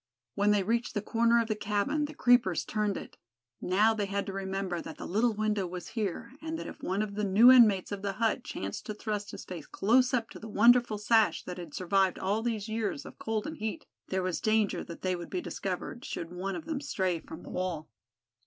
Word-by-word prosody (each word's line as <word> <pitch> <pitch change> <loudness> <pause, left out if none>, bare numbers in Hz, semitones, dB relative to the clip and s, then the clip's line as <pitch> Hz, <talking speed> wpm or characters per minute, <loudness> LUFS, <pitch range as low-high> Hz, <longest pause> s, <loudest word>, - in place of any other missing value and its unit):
When 205 +1 +2
they 205 -1 +3
reached 230 +4 -1
the 205 - 0
corner 235 +1 +3
of 230 - 0
the 220 - +1
cabin 210 +9 0
the 300 +1 -8
creepers 245 - +3
turned 210 -2 -1
it. - - -9 0.4
Now 210 +5 +3
they 205 -2 -2
had 200 0 -2
to 195 - -5
remember 190 -2 -3
that 160 - -9
the - - -7
little 220 +4 +1
window 210 -3 0
was 180 0 -7
here, 225 +1 -3
and 320 0 -4
that - - -6
if - - -9
one 195 +3 0
of 205 -1 -5
the 210 +1 -2
new 210 +6 +7
inmates 215 -8 +6
of 200 -1 -4
the 200 -1 -2
hut 220 +1 0
chanced 100 +1 -5
to 215 - -4
thrust 210 -1 -3
his - - -8
face 170 -5 -8
close 250 +5 +3
up 235 -4 -1
to - - -9
the 220 - -9
wonderful 235 +1 +5
sash 220 +1 +3
that 180 0 -6
had 170 -4 -8
survived 190 0 +2
all 200 +4 0
these 225 -3 -2
years 220 -9 -2
of - - -11
cold 220 -1 -2
and 315 +1 -5
heat, 220 -4 -4 0.2
there 190 -1 -1
was 185 -2 -2
danger 215 -2 +1
that 170 - -10
they 185 -1 +1
would 175 -1 -7
be 365 - -2
discovered, 250 -7 -4
should 165 0 -5
one 190 +2 -3
of 320 - -6
them 310 -4 -3
stray 190 - -1
from 160 - -10
the - - -10
wall. 180 -4 -3
210 Hz, 230 wpm, -30 LUFS, 190-230 Hz, 0.4 s, new